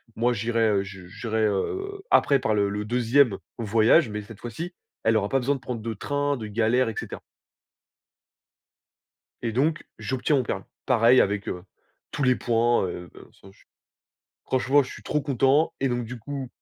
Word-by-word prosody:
Moi, 120 Hz, +2 st, +2 dB
j'irai, 115 Hz, 0 st, +1 dB
heu, 100 Hz, -2 st, +2 dB
je 95 Hz, -2 st, -10 dB
j'irai, 110 Hz, +3 st, -1 dB
heu, 390 Hz, -, -2 dB
après, 140 Hz, -2 st, +4 dB
par 110 Hz, -3 st, 0 dB
le 100 Hz, -1 st, +2 dB
le 105 Hz, +1 st, -3 dB
deuxième 120 Hz, -1 st, +3 dB, 0.2 s
voyage, 115 Hz, +6 st, +4 dB
mais 105 Hz, 0 st, -4 dB
cette 110 Hz, +1 st, -12 dB
fois-ci, 160 Hz, -, -6 dB, 0.3 s
elle 110 Hz, 0 st, +3 dB
aura 100 Hz, -1 st, -1 dB
pas 135 Hz, -, +2 dB
besoin 140 Hz, +3 st, +1 dB
de -, -, -7 dB
prendre 120 Hz, -3 st, -5 dB
de 115 Hz, +1 st, -3 dB
train, 145 Hz, +5 st, -1 dB
de 110 Hz, -, -6 dB
galère, 115 Hz, +3 st, +2 dB
et 110 Hz, -, -6 dB
cetera. -, -, -7 dB, 2.2 s
Et 115 Hz, -, -2 dB
donc 150 Hz, +8 st, 0 dB
j'obtiens 130 Hz, +6 st, 0 dB
mon 130 Hz, -, +1 dB
permis. 95 Hz, -4 st, -4 dB, 0.2 s
Pareil 120 Hz, 0 st, +5 dB
avec, 100 Hz, 0 st, -1 dB
heu, 90 Hz, 0 st, -4 dB, 0.5 s
tous 145 Hz, -, -2 dB
les 130 Hz, -1 st, +4 dB
points, 120 Hz, -1 st, +2 dB
heu, 90 Hz, 0 st, -7 dB
de -, -, -13 dB
toute -, -, -17 dB
façon 95 Hz, -, -16 dB
je -, -, -25 dB
suis -, -, -26 dB, 0.8 s
franchement 135 Hz, +2 st, +3 dB
je 130 Hz, -, -9 dB
suis -, -, -11 dB
trop 150 Hz, -, -1 dB
content 140 Hz, +3 st, +2 dB
et 135 Hz, -, +2 dB
donc 120 Hz, -1 st, -1 dB
du 120 Hz, +2 st, -7 dB
coup 135 Hz, +2 st, -6 dB
120 Hz, 190 wpm, -25 LUFS, 105-135 Hz, 2.2 s, Pareil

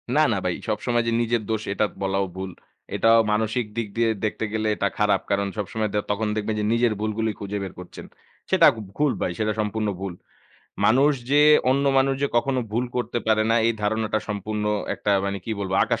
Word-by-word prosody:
না, -, -, +5 dB
না -, -, 0 dB
ভাই -, -, +1 dB, 0.2 s
সবসময় 120 Hz, -1 st, 0 dB
যে, -, -, +1 dB
নিজের 120 Hz, 0 st, 0 dB
দোষ 110 Hz, -1 st, 0 dB
এটা 105 Hz, -, +1 dB, 0.2 s
বলাও 95 Hz, 0 st, 0 dB
ভুল। 95 Hz, 0 st, -5 dB, 0.4 s
এটাও 115 Hz, 0 st, +5 dB
মানসিক 110 Hz, +2 st, 0 dB
দিক 115 Hz, -2 st, -1 dB
দিয়ে 115 Hz, -1 st, +3 dB, 0.2 s
দেখতে 110 Hz, +1 st, -2 dB
গেলে 110 Hz, 0 st, 0 dB
এটা 100 Hz, -, 0 dB
খারাপ। 105 Hz, -1 st, +2 dB
কারণ 100 Hz, 0 st, +1 dB
সবসময় 105 Hz, +1 st, -2 dB
দে 105 Hz, -, +2 dB
তখন 105 Hz, +2 st, -1 dB
দেখবেন 110 Hz, 0 st, -2 dB
যে, 105 Hz, -, 0 dB
নিজের 115 Hz, -1 st, +2 dB
ভুলগুলি 110 Hz, +1 st, -1 dB
খুঁজে 100 Hz, 0 st, -4 dB
বের 95 Hz, -, -6 dB
করছেন। 90 Hz, -, -10 dB, 0.4 s
সেটা -, -, +6 dB
গ -, -, -13 dB, 0.2 s
ভুল 150 Hz, -1 st, +3 dB
ভাই, -, -, 0 dB
সেটা 110 Hz, 0 st, +1 dB
সম্পূর্ণ 110 Hz, 0 st, -1 dB
ভুল। 95 Hz, -2 st, -4 dB, 0.7 s
মানুষ 135 Hz, +6 st, +5 dB, 0.2 s
যে, 145 Hz, +1 st, +5 dB, 0.3 s
অন্য 140 Hz, +2 st, +2 dB
মানুষ 135 Hz, 0 st, +2 dB
যে, -, -, +4 dB
কখনো 130 Hz, +2 st, +1 dB
ভুল 120 Hz, +3 st, +1 dB
করতে 120 Hz, -1 st, -1 dB
পারে 110 Hz, -1 st, +3 dB
না -, -, +4 dB
এই 115 Hz, -, +3 dB
ধারণাটা 110 Hz, +1 st, 0 dB
সম্পূর্ণ 105 Hz, +1 st, -3 dB, 0.3 s
একটা 105 Hz, -, -2 dB
মানে 100 Hz, 0 st, -2 dB
কি -, -, -5 dB
বলব 95 Hz, -1 st, -3 dB
আকাশ 115 Hz, 0 st, -1 dB
110 Hz, 205 wpm, -24 LUFS, 105-115 Hz, 0.7 s, সেটা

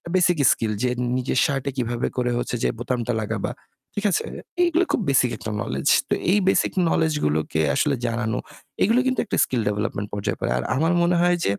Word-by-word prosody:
Basic 175 Hz, -2 st, +3 dB
skill. 110 Hz, -2 st, 0 dB
যে 125 Hz, -, +2 dB, 0.3 s
নিজের 130 Hz, 0 st, 0 dB
শার্টে 140 Hz, -2 st, -1 dB
কিভাবে 120 Hz, -1 st, -1 dB
করে 125 Hz, -1 st, +1 dB
হচ্ছে 120 Hz, -, -2 dB
যে -, -, +3 dB
বোতামটা 120 Hz, -1 st, -2 dB
লাগাবা। 105 Hz, -, -3 dB, 0.5 s
ঠিক 205 Hz, -, -2 dB
আছে? -, -, 0 dB, 0.4 s
এগুলো 345 Hz, +2 st, +2 dB
খুব -, -, +1 dB
বেসিক 130 Hz, -2 st, +3 dB
একটা 110 Hz, -, -5 dB
নোলেজ। -, -, -3 dB, 0.4 s
এই 210 Hz, -, +4 dB
বেসিক 190 Hz, -, +2 dB, 0.2 s
নোলেজ 160 Hz, -1 st, +2 dB
গুলোকে 80 Hz, +1 st, 0 dB
আসলে 145 Hz, -2 st, +2 dB
জানানো; 115 Hz, -1 st, -1 dB, 0.5 s
এগুলো 230 Hz, +5 st, +4 dB
কিন্তু 260 Hz, -, 0 dB
একটা -, -, -2 dB
স্কিল 125 Hz, -1 st, -1 dB
ডেভেলপমেন্ট 105 Hz, 0 st, -2 dB
পর্যায়ে 100 Hz, -1 st, -2 dB
পড়ে। -, -, -2 dB
আর 60 Hz, -, -2 dB
আমার 160 Hz, +5 st, +2 dB
মনে 175 Hz, +1 st, +3 dB
হয় 175 Hz, 0 st, +3 dB
যে, -, -, +2 dB
125 Hz, 185 wpm, -23 LUFS, 115-170 Hz, 0.5 s, এই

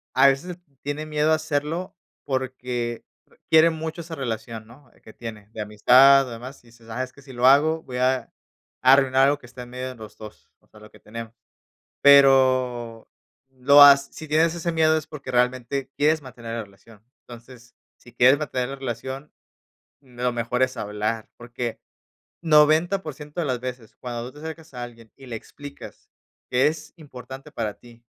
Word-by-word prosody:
a 130 Hz, +2 st, +6 dB
veces 150 Hz, +6 st, 0 dB, 0.3 s
tiene 145 Hz, +2 st, -4 dB
miedo 155 Hz, 0 st, +1 dB
a -, -, +5 dB
hacerlo 155 Hz, +4 st, -3 dB, 0.3 s
porque, 125 Hz, -3 st, -3 dB, 0.3 s
eh, -, -, -26 dB
quiere 160 Hz, +1 st, +6 dB
mucho 160 Hz, +1 st, -6 dB
esa 165 Hz, 0 st, -7 dB
relación, 115 Hz, -4 st, -5 dB
¿no? 125 Hz, +2 st, -18 dB
Que 110 Hz, -, -13 dB
tiene 110 Hz, -3 st, -10 dB
de 110 Hz, -, -11 dB
amistad, 125 Hz, +6 st, +5 dB
demás, 125 Hz, +4 st, -10 dB
y -, -, -23 dB
dices: 115 Hz, -1 st, -20 dB
“Ah, 120 Hz, +3 st, -3 dB
es 130 Hz, -, -8 dB
que 140 Hz, -, -18 dB
si 135 Hz, -1 st, -13 dB
lo 120 Hz, 0 st, 0 dB
hago, 155 Hz, +4 st, +4 dB
voy 125 Hz, -1 st, -7 dB
a 130 Hz, +1 st, 0 dB, 0.5 s
arruinar 135 Hz, 0 st, +5 dB
algo 145 Hz, +1 st, +2 dB
que 130 Hz, -, -16 dB
está 125 Hz, +1 st, -10 dB
en 120 Hz, -, -14 dB
medio 125 Hz, +1 st, -5 dB
de 130 Hz, -, -9 dB
los 110 Hz, -2 st, -12 dB
2, 110 Hz, -1 st, -13 dB
o -, -, -32 dB
sea, 110 Hz, -, -18 dB
lo 105 Hz, 0 st, -15 dB
que -, -, -19 dB
tenemos”. 115 Hz, +1 st, -9 dB, 0.7 s
Pero 130 Hz, -4 st, +4 dB, 0.4 s
lo 135 Hz, +2 st, +5 dB
ha 140 Hz, -1 st, +11 dB
si 140 Hz, +3 st, -10 dB
tienes 160 Hz, +2 st, +2 dB
ese 170 Hz, 0 st, -3 dB
miedo 160 Hz, -1 st, +3 dB
es 155 Hz, -, -6 dB
porque 140 Hz, -4 st, -8 dB
realmente 130 Hz, +2 st, 0 dB
quieres 155 Hz, +2 st, +2 dB
mantener 120 Hz, -4 st, -8 dB
la 115 Hz, -, -4 dB
relación. 100 Hz, +2 st, -20 dB, 0.2 s
Entonces, 120 Hz, 0 st, -14 dB, 0.2 s
si 120 Hz, -, -18 dB
quieres 125 Hz, +3 st, +5 dB
mantener 130 Hz, -4 st, -3 dB
la 135 Hz, -, -5 dB
relación, 135 Hz, +2 st, -6 dB, 0.7 s
mm, 130 Hz, -3 st, -21 dB
lo 125 Hz, 0 st, +1 dB
mejor 120 Hz, +1 st, -1 dB
es 130 Hz, 0 st, -1 dB
hablar, 105 Hz, +2 st, -3 dB
porque 120 Hz, -1 st, -6 dB, 0.6 s
90% 155 Hz, 0 st, +2 dB
de 165 Hz, -, -2 dB
las 130 Hz, -2 st, -1 dB
veces, 125 Hz, -3 st, -8 dB
cuando 120 Hz, 0 st, -6 dB
tú 145 Hz, -, -16 dB
te 150 Hz, -, -11 dB
acercas 160 Hz, -2 st, -9 dB
a 125 Hz, -, -6 dB
alguien 115 Hz, -2 st, -13 dB
y 135 Hz, -, -14 dB
le 120 Hz, -, -7 dB
explicas 145 Hz, +5 st, -12 dB, 0.4 s
que 125 Hz, +2 st, +4 dB
es 155 Hz, 0 st, -7 dB
importante 135 Hz, -4 st, -11 dB
para 110 Hz, -3 st, -4 dB
ti, 120 Hz, -1 st, -19 dB
130 Hz, 185 wpm, -23 LUFS, 120-145 Hz, 0.7 s, ha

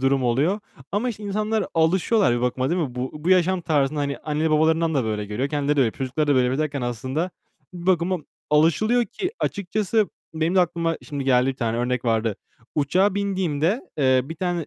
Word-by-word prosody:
durum 135 Hz, 0 st, +2 dB
oluyor. 145 Hz, -, +1 dB, 0.3 s
Ama 215 Hz, +5 st, 0 dB
işte, 215 Hz, -3 st, -6 dB
insanlar 210 Hz, +1 st, -1 dB
alışıyorlar 175 Hz, -, +3 dB
bir -, -, -2 dB
bakıma 125 Hz, +3 st, 0 dB
değil 180 Hz, -, +1 dB
mi? 135 Hz, -7 st, -3 dB
Bu 125 Hz, +1 st, -3 dB
bu 150 Hz, +4 st, -2 dB
yaşam 185 Hz, 0 st, +3 dB
tarzına, 150 Hz, -3 st, +1 dB
hani, 140 Hz, -1 st, -2 dB
anne 155 Hz, +1 st, -1 dB
babalarından 160 Hz, +1 st, +2 dB
da 135 Hz, -4 st, +1 dB
böyle 105 Hz, -1 st, -2 dB
görüyor, 120 Hz, +7 st, -2 dB
kendileri 145 Hz, 0 st, 0 dB
de -, -, +4 dB
öyle, 120 Hz, -4 st, +3 dB
çocukları 135 Hz, +5 st, -2 dB
da 145 Hz, -, +3 dB
böyle 130 Hz, -, +4 dB
yapıyor 130 Hz, +5 st, 0 dB
derken 140 Hz, -2 st, -4 dB
aslında 130 Hz, -, -2 dB, 0.4 s
bir 175 Hz, -1 st, -8 dB
bakıma 185 Hz, 0 st, +2 dB, 0.3 s
alışılıyor 190 Hz, +11 st, +3 dB
ki 365 Hz, -, -4 dB
açıkçası 205 Hz, +2 st, 0 dB, 0.3 s
benim 160 Hz, +3 st, 0 dB
de 190 Hz, -, +6 dB
aklıma 170 Hz, -1 st, 0 dB
şimdi 140 Hz, -2 st, -4 dB
geldi, 125 Hz, -1 st, +3 dB
bir 135 Hz, -1 st, -1 dB
tane 115 Hz, -2 st, -1 dB
örnek 125 Hz, 0 st, -1 dB
vardı. 115 Hz, -3 st, +1 dB, 0.4 s
Uçağa 185 Hz, +7 st, +2 dB
bindiğimde, 190 Hz, -, 0 dB, 0.2 s
eee, 130 Hz, -2 st, +4 dB
bir 160 Hz, +4 st, -7 dB
tane, 175 Hz, -2 st, -2 dB
155 Hz, 195 wpm, -23 LUFS, 130-185 Hz, 0.4 s, de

